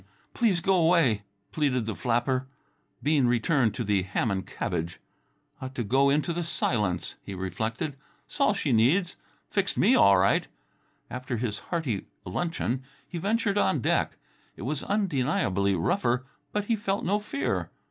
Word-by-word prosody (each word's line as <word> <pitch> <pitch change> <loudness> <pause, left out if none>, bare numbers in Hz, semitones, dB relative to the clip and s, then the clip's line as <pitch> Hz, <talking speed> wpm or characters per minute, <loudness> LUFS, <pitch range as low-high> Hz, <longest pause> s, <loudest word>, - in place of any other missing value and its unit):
"Please 205 -8 +2
go 195 - +2
away," 165 - +4 0.3
pleaded 130 -6 +1
the 110 - -2
flapper. 120 - 0 0.6
Bean 145 -3 +3
returned 120 -1 +2
to 120 - -2
the 100 -2 +2
ham 95 +5 -1
and 95 -1 -2
cabbage. 85 +2 -3 0.6
"Ought 130 0 -6
to 120 - -1
go 135 +6 +3
into 150 +4 +1
the 175 +1 -2
silence," 105 - -1
he 100 - -7
reflected. 110 - -3 0.3
"'S - - -10
all 215 -7 +4
she 150 -8 -1
needs. 155 - +3 0.4
Fixed 200 -1 0
me 225 +7 +5
all 100 - +6
right." 95 +2 +3 0.6
After 125 -1 -3
his 110 -3 -2
hearty 145 - -2 0.2
luncheon 130 - -2 0.3
he 175 - -5
ventured 205 +1 +1
on 155 - +2
deck. - - 0 0.4
It - - -9
was 140 +3 -2
undeniably 130 - +1
rougher, 120 +8 +1 0.3
but 210 -1 -1
he 230 - +2
felt 200 -1 -2
no 205 +3 +2
fear. 215 +7 -2
130 Hz, 155 wpm, -27 LUFS, 110-175 Hz, 0.6 s, all